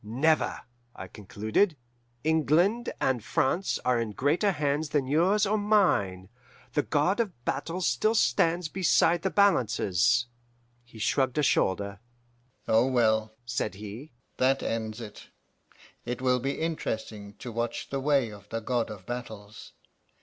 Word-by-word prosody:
"'Never,' 140 +9 +1 0.3
I 95 - -8
concluded. 110 - -1 0.5
'England 160 - +2
and 125 -4 0
France 165 +6 0
are 125 -2 +2
in 110 -2 -4
greater 155 - +1
hands 150 0 -1
than 145 -3 0
yours 180 +10 +2
or 210 +2 +1
mine. 175 - +2 0.5
The 145 - +2
God 155 +9 +1
of 185 - -3
battles 180 +2 -2
still 220 +1 +1
stands 170 -4 +2
beside 175 -1 +2
the 190 - 0
balances.' 120 - +2 0.6
"He 120 -1 -16
shrugged 130 +4 0
a 150 - +2
shoulder. 100 -5 +1 0.7
'Oh 115 +3 +4
well,' 110 -4 +1
said 115 -3 -2
he, 105 +8 -9 0.2
'that 135 +1 +2
ends 110 0 -3
it. 105 -3 -10 0.7
It 125 0 -4
will 125 -1 +2
be 135 +3 -3
interesting 110 -10 -4
to 120 +3 -8
watch 115 +1 -4
the 135 - -1
way 135 -4 +1
of 100 -1 -13
the 115 - -3
God 120 +1 -1
of 100 -4 -9
battles. 110 -4 -8
130 Hz, 140 wpm, -28 LUFS, 110-160 Hz, 0.7 s, Oh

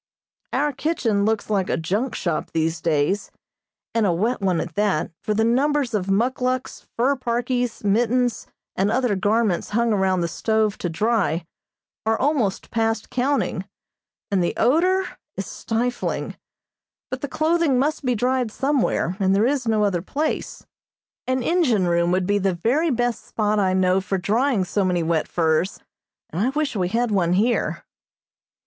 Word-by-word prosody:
Our 290 +2 0
kitchen 250 -9 0
looks 220 -1 0
like 195 -3 0
a - - +1
junk 205 +10 -1
shop 170 -4 -2
these 160 0 0
days, 160 +5 0 0.6
and 230 - +2
a - - +3
wet 215 +8 0
one 185 -4 +1
at 170 - -4
that, 205 -7 0
for 215 -1 -1
the 220 - +2
numbers 265 +2 +1
of 195 -3 -1
muckluks, 255 +5 -1
fur 260 +4 +3
parkies, 245 -1 -2
mittens, 240 +4 +1 0.3
and 195 +2 +1
other 245 -2 +1
garments 205 -1 +1
hung 235 -1 +2
around 190 -2 +1
the 170 - 0
stove 220 +4 0
to 175 - -2
dry 180 -3 0 0.6
are 225 0 +1
almost 260 -9 0
past 225 -1 -1
counting, 270 +3 0 0.7
and 190 -3 +2
the 175 - -1
odor 365 +8 +3 0.3
is 195 - -3
stifling; 240 +5 -2 0.8
but 260 - -4
the 285 - -2
clothing 315 -2 +1
must 295 +4 0
be 250 -2 +1
dried 250 +1 +1
somewhere, 265 - 0
and 190 -1 +3
there 205 +3 +3
is 260 -2 0
no 215 -1 +2
other 190 -4 +1
place. 295 - -3 0.6
An 255 -1 0
engine 255 - +2
room 170 0 +2
would 185 0 +1
be 205 +2 +1
the 190 -2 0
very 260 - +1
best 240 -3 -1
spot 210 -1 0
I 190 -2 +2
know 185 0 +3
for 195 +1 -2
drying 220 +3 +1
so 200 +2 0
many 180 -2 +1
wet 160 -1 0
furs, 165 +2 0 0.5
and 170 - -2
I 250 - +2
wish 295 -1 -1
we 185 -3 0
had 230 +4 0
one 180 -4 +2
here. 225 +6 0
220 Hz, 165 wpm, -23 LUFS, 190-255 Hz, 0.8 s, a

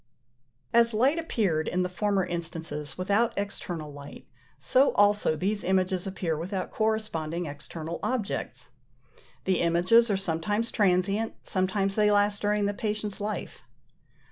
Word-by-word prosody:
As 235 -1 +4
light 270 +9 +3
appeared, 195 - 0
in 180 +1 0
the - - 0
former 195 +1 0
instances, 165 -3 -5
without 205 +6 +1
external 175 -6 -4
light, 145 0 -11 0.3
so 255 - +3
also 205 -5 +3
these 200 +6 -1
images 185 0 +1
appear 180 -4 -2
without 185 +4 -4
corresponding 195 -7 -1
external 155 +3 -6
objects. 240 -5 -3 0.7
The 185 -1 +1
images 180 +8 +4
are 200 - +2
sometimes 195 +5 -1
transient, 200 +2 +1
sometimes 195 +1 0
they 210 0 +3
last 205 0 +2
during 210 0 +1
the 205 - 0
patient's 210 0 -3
life. 210 +1 -4
195 Hz, 130 wpm, -27 LUFS, 170-210 Hz, 0.7 s, As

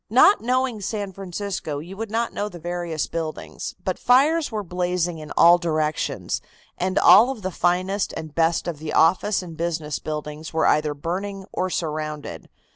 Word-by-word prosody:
"Not 260 - +6
knowing 250 -2 0
San 200 -1 -3
Francisco, 190 -4 -4
you 170 +6 -8
would 225 +1 -5
not 230 +2 -1
know 205 +1 -2
the 175 - -10
various 175 -2 -3
buildings, 160 -2 -5
but - - -2
fires 290 +5 +3
were 215 -2 -2
blazing 180 -1 -1
in 155 -1 -9
all 175 +1 +7
directions, 155 -3 -1 0.3
and 185 +1 -1
all 225 +5 +7
of 245 -7 -5
the 185 - -2
finest 185 +3 0
and 160 -2 -7
best 165 +1 +1
of 165 -4 -4
the 155 -1 -5
office 185 +4 +3
and 170 -2 -9
business 160 -2 -2
buildings 150 0 -5
were 160 0 +1
either 150 -1 +2
burning 190 +6 -4
or 185 - -1
surrounded. 155 - -4
175 Hz, 170 wpm, -23 LUFS, 155-200 Hz, 0.3 s, all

